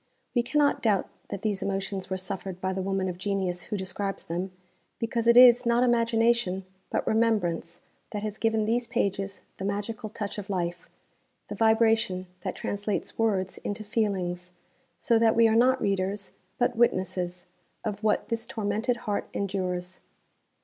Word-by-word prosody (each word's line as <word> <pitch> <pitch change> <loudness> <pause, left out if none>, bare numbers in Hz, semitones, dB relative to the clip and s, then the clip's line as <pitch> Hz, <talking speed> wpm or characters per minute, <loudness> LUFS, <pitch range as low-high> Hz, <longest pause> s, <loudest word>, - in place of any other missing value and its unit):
_ - - -44 0.3
We 240 - +3
cannot 285 +4 +2
doubt 210 -5 +2 0.2
that 200 - -5
these 205 -3 0
emotions 195 -1 -3
were 190 - -1
suffered 190 -1 -4
by 190 0 -1
the 190 - -2
woman 195 0 -1
of 180 -1 -5
genius 185 -2 -1
who 210 - -3
describes 195 +1 -3
them, 180 +3 -3 0.5
because 230 0 -1
it 235 0 +7
is, 245 0 +9
not 235 0 +3
imagination, 230 -5 +2 0.2
but - - -1
remembrance, 180 -7 +1 0.3
that 210 -2 -4
has 215 0 -4
given 220 -1 +2
these 235 +2 0
pages 200 -4 -2
the - - -6
magical 210 +3 -3
touch 210 -1 -5
of 205 0 -8
life, 175 -2 -3 0.6
the - - -4
'vibration' 220 -4 +3
that - - -4
translates 205 +1 -3
words 195 -4 +1
'into 205 +1 -4
feelings,' 185 -5 -1 0.4
so 230 -2 +3
that 225 -1 +4
we 230 0 +6
are 220 - +2
not 255 +3 +4
readers, 195 0 -1 0.3
but 245 0 +1
witnesses, 180 -5 0 0.4
of 210 -1 -4
what 215 - +1
this 230 0 -2
tormented 225 +1 -1
heart 205 -1 -2
endures. 185 -2 -2
205 Hz, 160 wpm, -27 LUFS, 190-230 Hz, 0.6 s, is